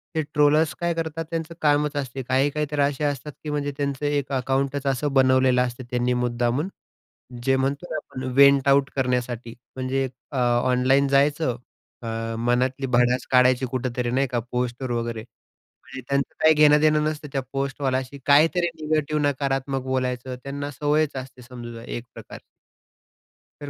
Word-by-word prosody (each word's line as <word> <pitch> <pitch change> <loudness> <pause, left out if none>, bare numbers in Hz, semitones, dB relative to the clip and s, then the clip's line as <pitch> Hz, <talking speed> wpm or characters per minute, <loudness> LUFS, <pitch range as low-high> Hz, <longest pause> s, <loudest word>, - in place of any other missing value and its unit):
हे 160 - +2
ट्रोलर्स 150 +1 +3
काय 170 0 0
करतात 165 0 -4
त्यांचं 165 0 -4
कामच 150 0 +2
असते. 135 -1 -4
काही-काही 140 +4 +1
तर 150 - -2
असे 140 +1 0
असतात, 145 +1 -3
की 150 - -5
म्हणजे 145 -1 -2
त्यांचं 140 0 -2
एक 145 -1 -1
अकाउंटच 135 +2 -1
असं 135 +2 0
बनवलेलं 130 -1 +4
असतं 125 +1 -5
त्यांनी 125 0 +1
मुद्दामून 120 +7 0 0.8
जे 135 0 +3
म्हणतो 140 +6 -1
ना 155 - -2
आपण 130 -3 -7
वेंट 140 0 +6
आऊट 140 0 +4
करण्यासाठी 125 -2 -2 0.2
म्हणजे 130 +1 -1 0.2
अ, - - -4
ऑनलाईन 125 +3 +2
जायचं 140 -1 +2 0.5
अ, 115 0 -4
मनातली 125 +3 0
भडास 125 +1 +2
काढायची 130 0 +4
कुठेतरी 125 -1 -2
नाही 135 +2 +1
का 120 - 0
पोस्टवर 125 +1 -2
वगैरे 115 -1 -2
म्हणजे 130 +2 -15
त्यांचं 140 0 -1
काही 155 0 +6
घेणं-देणं 150 0 +5
नसतं, 155 -1 -3
त्या 135 - 0
पोस्टवाल्याशी. 135 -1 -2
काहीतरी 165 +5 +4 0.2
निगेटिव्ह, 150 -1 0
नकारात्मक 135 -1 -1
बोलायचं. 130 -1 -2
त्यांना 140 +1 -4
सवयच 145 +1 0
असते 130 -1 -8
समजू 120 -1 -9
द्या, 115 0 -10
एक 120 - -6
प्रकार. - - -10 1.2
तर, 145 - -6
135 Hz, 150 wpm, -24 LUFS, 125-145 Hz, 1.2 s, वेंट